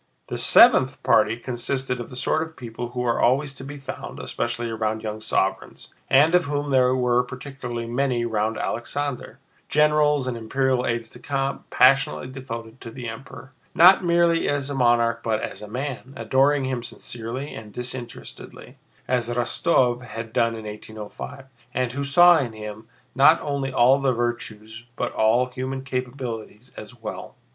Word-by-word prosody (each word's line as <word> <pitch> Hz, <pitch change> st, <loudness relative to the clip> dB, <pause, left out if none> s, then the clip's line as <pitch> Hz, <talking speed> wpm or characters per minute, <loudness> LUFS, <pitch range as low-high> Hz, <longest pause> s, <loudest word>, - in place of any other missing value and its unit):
The -, -, -3 dB
seventh -, -, +6 dB
party 110 Hz, +1 st, +3 dB
consisted 125 Hz, +1 st, -3 dB
of 120 Hz, -, -6 dB
the -, -, -10 dB
sort 155 Hz, +5 st, 0 dB
of 160 Hz, 0 st, -6 dB
people 120 Hz, -1 st, -6 dB
who 125 Hz, 0 st, -3 dB
are 120 Hz, -1 st, +1 dB
always 135 Hz, +3 st, +2 dB
to 135 Hz, -, -10 dB
be 145 Hz, +2 st, -8 dB
found, 135 Hz, -, -8 dB
especially 120 Hz, 0 st, -3 dB
around 110 Hz, -1 st, -2 dB
young 110 Hz, 0 st, -5 dB
sovereigns, 95 Hz, -3 st, -2 dB, 0.2 s
and 145 Hz, +5 st, +5 dB
of 180 Hz, -1 st, +4 dB
whom 145 Hz, 0 st, -2 dB
there 130 Hz, -1 st, +4 dB
were 125 Hz, -1 st, +2 dB
particularly 125 Hz, -2 st, -6 dB
many 120 Hz, 0 st, 0 dB
round 110 Hz, -1 st, -1 dB
Alexander—generals 145 Hz, +3 st, -1 dB
and 130 Hz, -2 st, -2 dB
imperial 130 Hz, +2 st, 0 dB
aides 115 Hz, -1 st, -2 dB
de -, -, -13 dB
camp 135 Hz, -1 st, -3 dB
passionately 130 Hz, 0 st, +3 dB
devoted 115 Hz, -3 st, -8 dB
to -, -, -8 dB
the 120 Hz, +1 st, -7 dB
Emperor, 130 Hz, +4 st, -9 dB, 0.2 s
not 185 Hz, +3 st, +7 dB
merely 170 Hz, -1 st, +3 dB
as 145 Hz, -1 st, -1 dB
a -, -, -2 dB
monarch 120 Hz, -2 st, +2 dB
but 110 Hz, -1 st, 0 dB
as -, -, -6 dB
a 105 Hz, -, -8 dB
man, 130 Hz, +3 st, -5 dB
adoring 135 Hz, +5 st, +2 dB
him 130 Hz, -2 st, -2 dB
sincerely 120 Hz, +4 st, -5 dB
and 105 Hz, -1 st, -9 dB
disinterestedly, 125 Hz, +1 st, -8 dB, 0.3 s
as 120 Hz, -2 st, 0 dB
Rostóv 120 Hz, +1 st, +1 dB
had 115 Hz, -3 st, -8 dB
done 115 Hz, -1 st, +2 dB
in 110 Hz, -1 st, -8 dB
1805, 110 Hz, +5 st, -8 dB, 0.3 s
and 125 Hz, -2 st, 0 dB
who 140 Hz, +3 st, -3 dB
saw 175 Hz, +4 st, +6 dB
in 120 Hz, -5 st, -3 dB
him 105 Hz, 0 st, -8 dB, 0.3 s
not 150 Hz, +5 st, +6 dB
only 140 Hz, -2 st, -2 dB
all 130 Hz, +3 st, +4 dB
the 135 Hz, -2 st, +1 dB
virtues 115 Hz, -2 st, -4 dB
but -, -, -2 dB
all 115 Hz, +3 st, +3 dB
human 130 Hz, +1 st, -5 dB
capabilities 125 Hz, -3 st, -5 dB
as 120 Hz, +3 st, -11 dB
well. 110 Hz, -1 st, -7 dB
125 Hz, 160 wpm, -24 LUFS, 115-135 Hz, 0.3 s, not